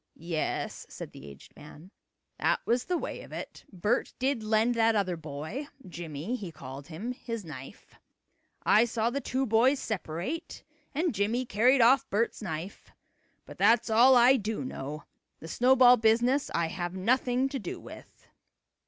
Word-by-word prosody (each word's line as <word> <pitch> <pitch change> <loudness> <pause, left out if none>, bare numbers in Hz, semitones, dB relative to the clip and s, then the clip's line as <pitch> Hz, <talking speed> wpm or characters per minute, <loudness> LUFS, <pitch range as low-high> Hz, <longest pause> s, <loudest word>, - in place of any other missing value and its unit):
"Yes," 165 -1 -3
said - - -8
the 70 - -12
aged 70 -1 -14
man, 155 +5 -14 0.5
"that - - +2
was 240 +1 +1
the 360 - 0
way - - -5
of - - -13
it. - - -8
Bert 210 +6 -1
did 260 -2 0
lend 220 +2 +2
that 225 -1 +3
other 190 -4 0
boy 160 - -6 0.2
Jimmie 170 - -5
he 195 -8 -6
called 135 -1 -10
him 190 +9 -5
his 230 -4 -6
knife. 135 -4 -11 0.7
I 215 - +5
saw 230 0 -1
the 280 +2 -2
two 265 +1 -1
boys 245 +5 +3
separate 200 - -5 0.3
and 325 +1 0
Jimmie 220 +5 0
carried 245 +5 +3
off 260 +4 +5
Bert's 230 +3 -1
knife. 180 -1 -6 0.5
But - - -12
that's 230 0 +4
all 245 +4 +7
I 250 +2 +6
do 220 +3 -3
know. 150 - -6 0.4
The 160 - -9
snowball 250 +4 +5
business 240 +5 +2
I 170 -1 +1
have 175 +1 -4
nothing 250 +6 +1
to 270 - -4
do 195 - -6
with." - - -14
220 Hz, 160 wpm, -29 LUFS, 170-250 Hz, 0.7 s, all